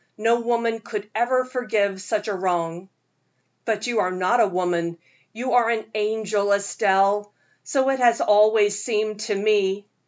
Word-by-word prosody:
No 230 +2 +2
woman 235 -1 -1
could 210 -2 -6
ever 255 +3 +1
forgive 215 -6 -1
such 210 +2 -3
a 210 - -1
wrong." 175 -1 -2 0.8
"But 220 -2 -1
you 240 -3 -1
are 180 - +1
not 185 +6 +1
a 215 - +5
woman, 175 -2 -2 0.3
you 240 +3 -4
are 240 -2 +4
an 225 -2 -1
angel, 210 -1 -1
Estelle 200 0 +1 0.3
so 270 -1 0
it 270 -1 0
has 235 -2 +4
always 210 -1 +3
seemed 215 -2 -2
to 215 -1 -2
me. 200 -1 +1
210 Hz, 155 wpm, -23 LUFS, 200-230 Hz, 0.8 s, a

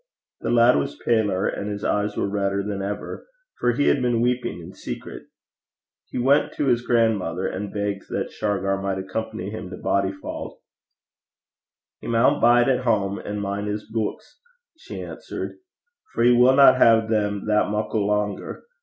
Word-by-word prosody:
The - - -3
lad 120 +1 +5
was 70 0 -2
paler 105 -5 +2
and 100 - -2
his 105 0 -5
eyes 105 0 0
were - - 0
redder 100 0 -1
than 100 -1 -4
ever, 100 +1 -5 0.3
for 120 - +2
he 145 +4 +1
had 140 - +3
been 120 -2 +1
weeping 120 -8 -1
in 85 - -10
secret. - - -8 0.8
He - - -5
went 135 +4 +3
to 145 - -1
his 120 -3 +2
grandmother 110 -8 +1
and 100 +2 -4
begged 100 -1 -3
that - - -3
Shargar 95 -2 -1
might 95 -1 -2
accompany 105 +2 -4
him 110 -4 -7
to 90 - -8
Bodyfauld. 95 0 -3 1.4
'He - - -9
maun 120 +5 +3
bide 120 +1 +5
at 130 -1 +1
hame 100 -4 0
an' 105 0 -4
min' 100 +1 -3
his 105 0 -4
beuks,' 115 - -4 0.4
she 320 - -8
answered; - - -7 0.6
'for 115 - +1
he 120 - +6
winna 130 +2 +7
hae 115 -2 +5
them 105 -2 -1
that 105 -1 +2
muckle 105 0 -1
langer. 105 -1 -2
105 Hz, 165 wpm, -23 LUFS, 100-120 Hz, 1.4 s, winna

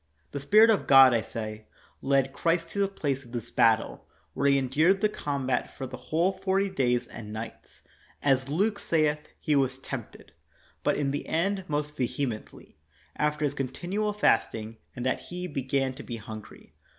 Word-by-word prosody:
The 140 - -4
Spirit 215 +11 +6
of 215 - 0
God, 135 -2 +8
I 115 - +2
say, 110 -1 -6 0.3
led 135 -1 +2
Christ 165 +2 0
to 200 - -5
the 200 - +3
place 140 -8 -2
of 120 -1 -16
this 120 -3 -5
battle, 110 -1 +2 0.3
where 140 +8 +2
He 140 - +5
en 135 -1 0
dured 160 +9 +3
the 215 +1 +2
combat 140 -9 -2
for 135 - -4
the 130 0 -7
whole 170 +4 +2
forty 190 +1 0
days 125 -7 +1
and 105 -2 -9
nights. 110 +1 -8 0.4
As 135 -1 +2
Luke 200 +7 +1
saith, 150 -2 +1
"He 150 - +1
was 135 -2 +1
tempted,' 135 - -8 0.3
' - - -33
but - - +2
in 140 -2 0
the 145 - -4
end 190 +3 0
most 150 0 -2
vehemently, 120 - -4 0.4
after 150 0 0
His 140 - 0
continual 175 +11 -2
fasting, 115 - +1 0.2
and 125 - -5
that 130 - +1
He 180 +1 -5
began 135 -3 -1
to - - -9
be 120 - -6
hungry. 110 -1 -10
140 Hz, 180 wpm, -28 LUFS, 130-170 Hz, 0.4 s, God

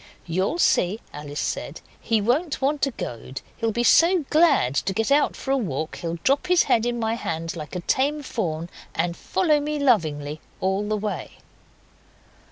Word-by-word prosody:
'You'll 185 - 0
see,' 205 - +2
Alice 145 0 -6
said, - - -3 0.2
'he 225 -2 +1
won't 290 - 0
want 280 +1 +1
a - - 0
goad. 130 - -6 0.2
He'll 225 -1 0
be 235 +3 0
so 335 +5 +5
glad 300 - +4
to 190 +7 0
get 225 +6 -1
out 290 +1 +3
for 270 - -4
a 275 - +3
walk 160 - -3
he'll 170 0 -4
drop 280 +6 +2
his 360 -2 +5
head 230 +1 +2
in 240 0 -1
my 225 0 0
hand 165 -6 -3
like 155 +1 -7
a 180 - -2
tame 285 - 0
fawn, 170 - -3 0.3
and 170 +1 0
follow 310 - +1
me 300 +1 -2
lovingly 155 - +1 0.2
all 190 +2 0
the 215 0 0
way. 210 0 -4
220 Hz, 175 wpm, -24 LUFS, -, 0.3 s, so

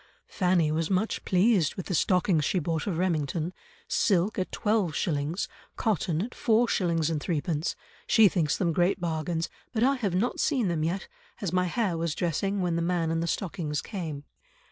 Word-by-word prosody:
"Fanny 180 -5 +1
was 160 +1 0
much 195 +3 0
pleased 185 -3 +3
with 185 - -5
the - - -3
stockings 180 -2 +2
she 185 - 0
bought 165 -1 -1
of 180 -5 -1
Remmington, 165 -1 -1 0.3
silk 195 +1 +2
at 185 - -2
twelve 210 -8 0
shillings, 155 +2 -1 0.3
cotton 180 -5 0
at 245 - -6
four 235 +1 +2
shillings 165 -6 +1
and 155 -2 -1
threepence; 160 0 -1 0.3
she 220 -2 +6
thinks 165 -6 +1
them 170 -3 +1
great 180 +4 +2
bargains, 165 -1 -2 0.2
but 225 -2 0
I 270 +2 +4
have 200 -8 -1
not 220 +7 0
seen 255 - +1
them 160 -3 0
yet, 175 +5 -2 0.3
as 185 -4 -3
my 180 0 +2
hair 180 -2 -1
was 165 -2 -1
dressing 195 +4 -1
when 170 -2 0
the - - 0
man 170 -1 0
and 165 0 0
the 170 - -1
stockings 160 -4 -2
came." 160 -9 -5
175 Hz, 185 wpm, -28 LUFS, 160-195 Hz, 0.3 s, she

